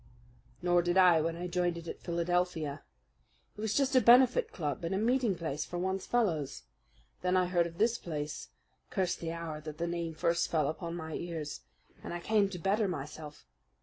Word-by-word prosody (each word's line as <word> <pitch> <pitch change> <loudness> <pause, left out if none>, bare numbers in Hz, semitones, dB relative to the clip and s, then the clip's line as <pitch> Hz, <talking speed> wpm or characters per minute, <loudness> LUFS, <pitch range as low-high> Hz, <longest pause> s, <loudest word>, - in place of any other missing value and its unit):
"Nor 175 0 +4
did 175 +1 0
I 180 -4 +6
when 165 +1 -1
I 175 +1 -5
joined 175 -1 0
it 170 0 -8
at - - -6
Philadelphia. 170 -3 -1 0.7
It 210 - -8
was 215 -1 -1
just 275 -1 +2
a 255 - +7
benefit 245 +2 +6
club 150 -3 -3
and 170 +3 -1
a - - +1
meeting 235 -1 +2
place 155 -3 -3
for 175 - -6
one's 190 +1 -2
fellows. 170 - 0 0.6
Then 180 0 +2
I 185 - +3
heard 175 -1 +2
of 165 0 -12
this 230 +3 +2
place 150 -3 -5 0.4
curse 185 -3 0
the 165 -1 -5
hour 165 -2 -5
that 155 -1 -7
the 170 - -1
name 170 -1 -3
first 170 +2 +1
fell 155 -4 +2
upon 170 +1 -4
my 160 -2 -6
ears! 160 -3 -5 0.4
and - - -5
I - - -3
came 205 +2 +2
to 190 - -6
better 195 +4 +1
myself! 150 - -6
175 Hz, 195 wpm, -31 LUFS, 160-190 Hz, 0.7 s, a